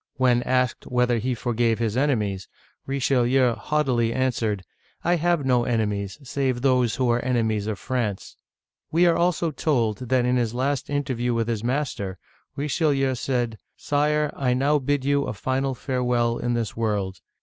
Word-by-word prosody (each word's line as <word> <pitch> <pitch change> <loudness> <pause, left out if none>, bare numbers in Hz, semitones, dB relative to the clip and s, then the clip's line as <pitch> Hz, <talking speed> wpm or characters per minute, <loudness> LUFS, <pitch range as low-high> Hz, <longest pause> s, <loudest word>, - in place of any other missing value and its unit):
When 125 -2 +3
asked 125 -1 0
whether 125 -1 +2
he 125 +3 -1
forgave 115 -1 0
his 115 -2 -1
enemies, 110 -9 0 0.4
Richelieu 130 -2 +2
haughtily 130 -5 0
answered, 115 -6 -1 0.2
" - - -36
I 175 +1 +2
have 170 -3 +1
no 125 -2 +3
enemies, 105 -4 -1
save 130 -2 -1
those 125 -4 +3
who 130 - 0
are 120 +1 0
enemies 110 -4 0
of 110 -2 -2
France! 115 -6 -3 0.6
We 170 +3 +4
are 170 -1 +4
also 170 -1 +1
told 120 -9 0
that 130 -1 +3
in 125 0 +2
his 120 -1 -1
last 135 +2 -1
interview 130 -4 -1
with 115 -1 0
his 115 -2 -2
master, 120 -8 -2 0.4
Richelieu 140 -2 +1
said: 120 -3 -2
" - - -52
Sire, 150 +1 +2
I 125 -2 +1
now 145 +3 +2
bid 140 0 -1
you 140 0 +2
a - - -3
final 130 +5 -1
farewell 125 -2 0
in 120 0 -1
this 115 -3 -2
world. 100 -5 -2
125 Hz, 165 wpm, -24 LUFS, 115-140 Hz, 0.6 s, We